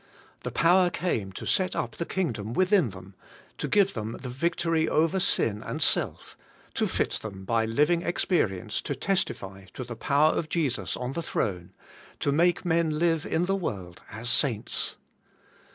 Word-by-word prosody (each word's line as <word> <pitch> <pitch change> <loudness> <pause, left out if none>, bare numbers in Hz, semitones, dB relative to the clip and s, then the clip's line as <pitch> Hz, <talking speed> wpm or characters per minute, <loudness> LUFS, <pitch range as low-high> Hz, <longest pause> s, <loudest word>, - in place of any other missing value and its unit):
The - - -3
power 180 +2 +4
came 115 - -2
to - - -7
set 185 -1 +1
up - - -3
the 170 - -3
kingdom 115 - -2
within 185 - +3
them, 95 0 -11 0.5
to - - -1
give 200 -2 +3
them 110 0 -4
the 125 - -6
victory 165 +4 0
over 165 +4 +2
sin 115 - +1
and - - -4
self, - - 0 0.4
to - - +1
fit - - 0
them 95 -3 -7
by 115 +1 +2
living 150 +9 +2
experience 110 - 0
to 145 - -3
testify 95 - -2
to 130 - -4
the 120 -1 -7
power 145 +6 +3
of 155 - -2
Jesus 150 -8 -1
on 125 +1 -3
the 170 - -2
throne, 90 - -2 0.5
to 140 - +1
make 175 +5 +2
men 165 -2 +2
live 165 -1 +1
in 170 +2 +1
the 195 - 0
world 95 - -5
as 110 +2 -6
saints. 120 -4 +1
150 Hz, 170 wpm, -27 LUFS, 110-175 Hz, 0.5 s, power